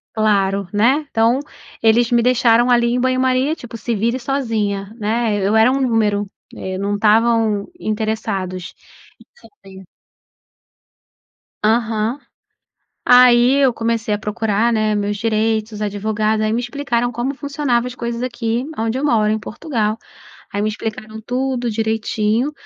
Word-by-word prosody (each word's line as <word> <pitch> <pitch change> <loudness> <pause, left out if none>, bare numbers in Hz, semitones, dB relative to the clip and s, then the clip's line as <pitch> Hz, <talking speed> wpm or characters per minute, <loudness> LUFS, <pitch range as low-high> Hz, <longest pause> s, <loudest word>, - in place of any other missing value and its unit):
Claro, 200 -3 +1
né, 260 +8 +2
então, 230 +3 +2 0.4
eles 230 +2 +3
me 235 -1 +4
deixaram 240 -1 +3
ali 240 -1 +3
em 250 - 0
banho 255 0 +1
maria 260 +3 +1
tipo 235 -4 -9
"se 230 +2 -2
vire 235 +5 0
sozinha", 220 -6 -2
né, 220 0 0
eu 200 +3 +2
era 225 +4 +5
um 275 - 0
número, 210 -5 +1 0.2
e 190 0 -5
não 200 +2 -1
estavam 220 -1 +2
interessados, 215 -4 -3 0.4
isso 480 - -20
eu - - -20 0.2
sei. 190 0 -12 1.8
Aham. 220 +2 +1 0.9
Aí 245 0 +6
eu 260 -3 +4
comecei 230 -2 -1
a - - -2
procurar, 215 +2 0
né, 215 -1 +1
meus 205 0 -1
direitos, 220 0 0
os 210 - -7
advogados, 215 +1 -1
aí 215 - 0
me 235 - 0
explicaram 245 -2 -2
como 250 +4 -2
funcionava 280 -4 -1
as 250 - -6
coisas 235 -1 -4
aqui 235 0 -2
aonde 225 +3 -1
eu 285 - -3
moro, 220 -7 +2
em 215 - 0
Portugal, 220 -2 -3 0.6
aí 205 - -2
me 215 - +1
explicaram 215 0 -6
tudo 250 0 -2
direitinho. 220 +3 -1
225 Hz, 145 wpm, -19 LUFS, 215-245 Hz, 1.8 s, Aí